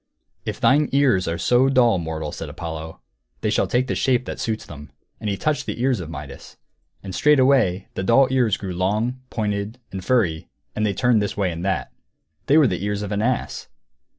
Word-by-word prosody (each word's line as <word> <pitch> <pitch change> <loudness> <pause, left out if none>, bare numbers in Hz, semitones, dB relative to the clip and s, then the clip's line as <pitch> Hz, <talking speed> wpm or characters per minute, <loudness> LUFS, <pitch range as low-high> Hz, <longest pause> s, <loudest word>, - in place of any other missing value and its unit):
"If - - -4
thine 145 +2 +3
ears 130 -10 +3
are 85 0 -1
so 125 +9 +3
dull, 120 -7 +4
mortal," 80 -2 -4
said 80 - -6
Apollo, 80 0 -7 0.4
"they - - 0
shall - - +1
take 125 +1 +1
the - - -2
shape 125 -1 +1
that - - -6
suits 110 -1 -2
them." 75 -2 -11 0.3
And 105 - -3
he 100 - -1
touched 155 +5 -1
the - - -4
ears 125 -2 +1
of 85 -3 -6
Midas. 80 - -9 0.5
And 95 -1 -7
straightway 130 -9 +3
the - - -3
dull 120 +7 +4
ears 125 -6 +2
grew 95 -3 -5
long, 105 +8 -1
pointed, 105 +1 -2
and 95 -1 -6
furry, 90 -11 +1 0.3
and 110 0 +1
they 100 - 0
turned 120 -1 +3
this 105 - -3
way 95 -3 +1
and 85 +1 -6
that. 95 -1 -1 0.6
They 145 - +5
were 155 - +6
the 90 -5 -1
ears 105 0 -2
of 105 - -5
an 105 0 0
ass! 125 +2 -2
105 Hz, 205 wpm, -22 LUFS, 90-125 Hz, 0.6 s, were